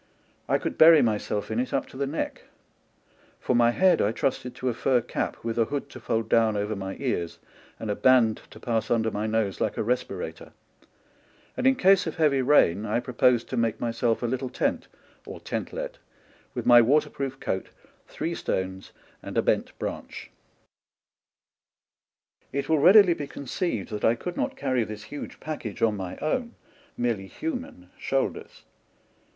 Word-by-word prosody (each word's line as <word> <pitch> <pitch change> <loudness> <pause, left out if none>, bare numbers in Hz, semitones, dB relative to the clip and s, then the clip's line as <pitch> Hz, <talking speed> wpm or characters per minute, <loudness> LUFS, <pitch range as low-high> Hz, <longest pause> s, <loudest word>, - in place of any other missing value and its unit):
I - - +4
could - - -5
bury 160 -1 +8
myself 105 -2 -1
in - - 0
it 255 - -1
up - - 0
to - - -15
the 140 +1 -2
neck; 150 +4 -4 0.9
for 125 - 0
my 120 0 +5
head 185 +9 +3
I 105 - +2
trusted 125 +1 -2
to 130 - -4
a - - -1
fur 125 +2 +2
cap, 115 - -3
with 115 0 -2
a 115 - +4
hood 140 +4 -4
to 125 - -9
fold 115 -1 -1
down 110 -2 +3
over 105 +1 -2
my 95 -1 -5
ears 100 -11 -2 0.4
and 110 - -3
a - - -1
band 120 -3 +4
to - - -13
pass 115 -2 -1
under 110 -1 +1
my 105 +1 -2
nose 110 -3 -1
like - - -1
a - - 0
re 120 +3 +3
spirator; 125 - -7 1.0
and 260 - +1
in 265 - +5
case 195 -6 +4
of 160 - -4
heavy 150 -4 +3
rain 125 - +4
I 110 +2 0
pro 125 +1 -7
posed 120 -1 +3
to 130 - -3
make 115 -2 0
myself 115 0 0
a - - +1
little 130 +2 -2
tent, - - -1 0.4
or - - -9
tentlet, - - -5 0.6
with - - -3
my 120 -1 +8
waterproof 135 +1 0
coat, 95 - -3 0.4
three 165 +3 -4
stones, 95 - -3 0.3
and - - -6
a - - +3
bent - - 0
branch. - - -6 2.2
It 140 +1 -2
will 160 -1 +3
readily 185 +3 +7
be 145 -3 -6
conceived 140 - -3
that 105 -1 -5
I 115 - +4
could 175 +9 -6
not - - -2
carry 130 -4 0
this 105 -1 -7
huge 145 +6 -8
package 150 -9 -5
on 110 -2 +3
my 95 -3 -6
own, 235 - -2 0.4
merely 115 -5 -1
human, 250 - -6
shoulders. 135 0 -2
120 Hz, 175 wpm, -26 LUFS, 110-145 Hz, 2.2 s, bury